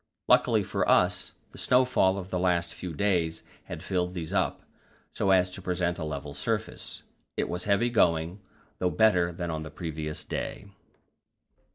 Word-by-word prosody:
Luckily 125 -4 +4
for - - -1
us, - - +3 0.2
the - - -9
snowfall 125 -7 +3
of 95 -1 -7
the 90 - 0
last 85 -2 +1
few 90 - -6
days 85 -2 0 0.2
had - - -7
filled 90 -1 -1
these 80 -3 -4
up, - - 0 0.5
so 95 - 0
as 90 -1 +4
to 95 - -7
present 90 -1 -1
a - - -3
level 75 -2 -5
surface. 70 - -3 0.3
It - - 0
was 90 0 -3
heavy 105 +4 +2
going, 85 -3 +2 0.4
though 90 - +2
better 90 -4 +3
than 85 0 -4
on 80 -1 -3
the 80 - -6
previous 75 -1 -5
day. - - -4
90 Hz, 165 wpm, -28 LUFS, 80-95 Hz, 0.5 s, Luckily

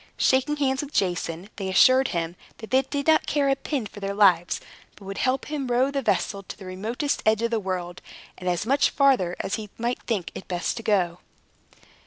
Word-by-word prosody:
Shaking 265 +3 +2
hands 270 -2 0
with 290 0 -8
Jason, 180 0 -1
they 195 -2 -3
assured 255 +7 +5
him 170 0 -3 0.2
that 220 - -10
they 260 +1 +5
did 280 +1 -4
not 315 -1 +4
care 285 -2 +1
a 270 - +3
pin 270 -3 -3
for 205 - -10
their 200 0 -3
lives, 180 -4 +4 0.4
but 200 - -15
would 195 0 -5
help 260 0 0
row 270 -3 0
the 280 -1 -1
vessel 200 -5 0
to 195 - -10
the 195 - -11
remotest 220 +10 -2
edge 220 +1 +2
of 235 - 0
the 230 - +1
world, 185 -2 -4 0.3
and 180 0 -3
as 175 +2 -1
much 275 +4 +3
farther 260 -11 +3
as 195 - -2
he 215 -2 -7
might 240 +2 -2
think 190 -8 -2
it - - -9
best 175 -2 -2
to - - -4
go. 180 -6 +1
220 Hz, 210 wpm, -25 LUFS, 185-265 Hz, 0.4 s, assured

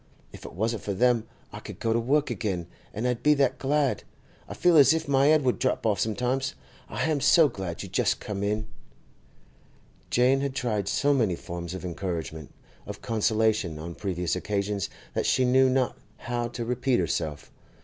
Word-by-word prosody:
If - - -11
it - - -8
wasn't 110 +5 -1
for 100 - -3
them 120 +1 +2 0.3
I - - -6
could - - -10
go 115 - 0
to 115 - +2
work 140 +5 +1
again, 95 -6 -2 0.3
an' 110 +4 -4
I'd 125 -2 0
be 150 0 +4
that 135 -2 +1
glad; 140 0 +1 0.5
I - - -6
feel 175 -1 +3
as 145 +1 +7
if 160 -1 -3
my 140 0 +4
'ed 155 -1 +4
would 125 -2 +1
drop 130 -3 0
off 105 -4 +2
sometimes! 125 +5 -1 0.3
I - - -4
ham 155 -3 +1
so 160 +2 +6
glad 95 - -5
you - - -7
just - - +1
come 100 -2 -5
in!' 105 +1 -1 1.4
Jane 130 +3 +3
had 140 -1 -2
tried 110 -7 -1
so 145 +8 +2
many 110 -10 +1
forms 85 +1 -6
of 95 - -7
encouragement, 85 -4 -5 0.4
of - - -8
consolation, 110 -6 +1
on 85 +2 -6
previous 90 -2 -2
occasions 100 -2 -2 0.2
that - - -1
she 130 - +3
knew 130 +1 +4
not 130 -1 +1 0.2
how 120 -1 -3
to 120 0 -5
repeat 125 +1 +1
herself. 80 -3 -2
115 Hz, 185 wpm, -27 LUFS, 100-135 Hz, 1.4 s, as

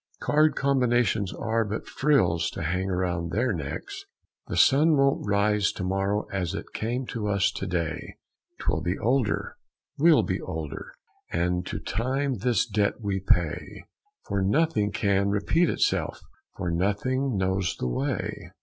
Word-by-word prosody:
Card 155 +1 +3
combinations 120 -7 +2
are 115 0 0
but 105 0 -4
frills 85 - +2
to 95 - -6
hang 90 +4 -1
around 90 -2 -1
their 115 +5 0
necks. 75 -6 -5 0.4
"The - - -3
sun 150 +3 +5
won't 135 -5 +2
rise 100 0 +2
to 95 - -5
morrow 95 +2 0
as 90 -3 -2
it - - -7
came 120 +4 -2
to 110 -3 -3
us 100 -2 +2
to 95 - -5
day, 85 -3 -3 0.4
'Twill 80 - -1
be 90 +3 -1
older, 125 -1 0 0.4
we'll 160 0 +6
be 95 -2 -2
older, 80 -3 -6 0.4
and 90 +1 0
to 105 - -3
Time 130 +5 -1
this 120 +1 +2
debt 105 -1 0
we 100 -3 -2
pay. 85 -4 0 0.4
For 100 - -1
nothing 105 -1 +2
can 100 -1 +1
repeat 105 - +2
itself, - - 0 0.4
for 90 - -2
nothing 105 +8 0
knows 95 -1 0
the - - -3
way." 100 - -3
100 Hz, 150 wpm, -26 LUFS, 95-125 Hz, 0.4 s, we'll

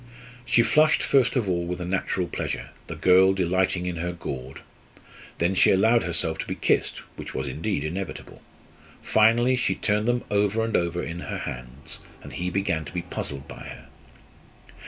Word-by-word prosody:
She 120 -1 +4
flushed 155 +4 +4
first 130 -2 +3
of 120 -6 +1
all 85 -2 0
with 90 +1 -4
a 90 - -4
natural 95 0 -1
pleasure, - - -4 0.2
the - - -6
girl 95 +4 +5
delighting 95 0 +1
in 90 -1 -3
her 90 +1 -2
gaud. 65 -6 -7 0.8
Then 85 +3 +1
she 95 - +5
allowed 110 +5 +4
herself 85 -2 -1
to - - -4
be - - -3
kissed, - - +1 0.2
which - - -8
was, - - -2
indeed, 80 -2 -2
inevitable. 85 +1 -6 0.6
Finally 120 +4 +4
she 125 - +1
turned 105 +1 0
them 120 0 +1
over 105 +2 +2
and 115 0 -1
over 85 0 0
in 85 +1 -5
her - - -5
hands; 65 +5 -7 0.2
and - - -10
he 90 +1 -2
began 90 -4 -1
to 70 - -9
be 90 +1 -3
puzzled 70 -5 -5
by - - -10
her. - - -11
90 Hz, 175 wpm, -25 LUFS, 85-110 Hz, 0.8 s, girl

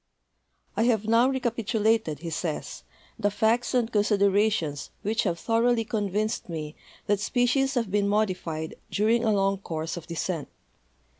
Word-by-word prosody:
"I 225 - +2
have 220 -3 +2
now 230 +3 +4
recapitulated," 225 - 0
he 165 - -4
says, 160 -1 -4 0.4
"the 205 -2 +2
facts 225 +5 +1
and 240 -2 +1
considerations 200 -7 +2
which 220 +2 +1
have 175 -3 0
thoroly 230 +3 +2
convinced 210 0 -1
me 155 -2 -5 0.3
that 205 -1 +1
spe 245 +4 +1
cies 270 +2 +1
have 230 -6 0
been 200 0 +2
modified 185 -6 -1
during 225 +3 +2
a 220 - +3
long 195 -1 +1
course 160 -3 -4
of 165 - -8
descent. 170 -2 -3
210 Hz, 145 wpm, -26 LUFS, 180-230 Hz, 0.4 s, now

